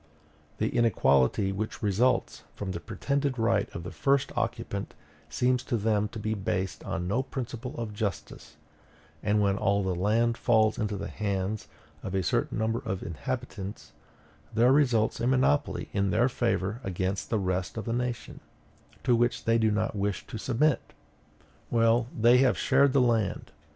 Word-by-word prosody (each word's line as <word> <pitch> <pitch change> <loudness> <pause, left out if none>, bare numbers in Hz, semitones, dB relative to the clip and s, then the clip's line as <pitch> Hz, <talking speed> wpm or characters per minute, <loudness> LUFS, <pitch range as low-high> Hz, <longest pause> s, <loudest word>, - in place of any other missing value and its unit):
The - - 0
inequality 95 - +3
which 110 +3 -4
results 105 +6 +1
from 100 -2 -4
the 85 - -4
pretended 135 +7 -2
right 115 0 +1
of 85 - -5
the 90 - -6
first 140 0 +1
occupant - - -3 0.3
seems 125 +9 +1
to 120 - 0
them 105 -1 +1
to 110 - -9
be 110 0 -2
based 95 -2 -2
on 90 - -3
no 115 +8 +1
principle 130 0 -6
of 115 -3 -4
justice; 100 -3 -5 0.6
and 105 0 +2
when 100 0 +1
all 100 0 +2
the 95 -1 0
land 115 +6 +1
falls 110 -2 +3
into 105 -1 -1
the 100 +1 -4
hands 100 0 -3 0.3
of 95 - -4
a 95 - +1
certain - - 0
number 110 +1 0
of 95 -5 -4
inhabitants, 105 - -5 0.6
there 120 +3 +4
results 125 -7 +2
a 120 - 0
monopoly 130 - +1
in 100 -1 +1
their 120 +6 +3
favor 115 -2 -1
against 95 0 -2
the 115 - +1
rest 95 0 -2
of 110 - -4
the 115 - -1
nation, 125 -1 -3 0.6
to 125 -2 +3
which 120 +1 0
they 115 0 +3
do 110 -1 +3
not 105 +1 -1
wish 100 0 -2
to 110 - -7
submit." 130 +6 0 0.8
Well, 115 0 +3
they 120 +3 +6
have 130 -1 +3
shared 135 +1 +3
the 140 - +4
land. 115 -5 0
110 Hz, 165 wpm, -28 LUFS, 100-120 Hz, 0.8 s, they